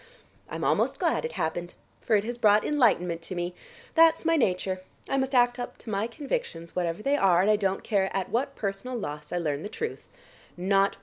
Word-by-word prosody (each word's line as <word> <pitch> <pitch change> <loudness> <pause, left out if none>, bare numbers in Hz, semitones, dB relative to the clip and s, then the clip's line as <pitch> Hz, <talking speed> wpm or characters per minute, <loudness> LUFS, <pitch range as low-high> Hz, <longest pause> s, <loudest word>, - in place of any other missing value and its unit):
I'm - - -5
almost - - +2
glad - - +1
it 475 - -4
happened, 175 +2 -3 0.3
for 225 - +2
it 200 - +3
has 240 +2 -5
brought 210 -2 +5
enlightenment 180 - +2
to 185 +3 -6
me. 175 0 -3 0.4
That's 330 0 +5
my 330 0 +4
nature. 185 - 0 0.3
I - - -1
must 265 0 0
act 245 0 +4
up 245 - -5
to 225 - -8
my 205 +2 0
convictions 270 - -4
whatever 175 +2 -1
they 280 +1 +2
are 185 -8 +4
and 210 - +4
I - - +5
don't 195 -2 -1
care 195 -3 +1
at 190 -2 -2
what 275 +5 -1
personal 205 +5 -3
loss 150 -7 -6
I 175 - -1
learn 150 -4 -1
the 205 - -5
truth. 455 - -5
210 Hz, 200 wpm, -27 LUFS, 180-255 Hz, 0.4 s, brought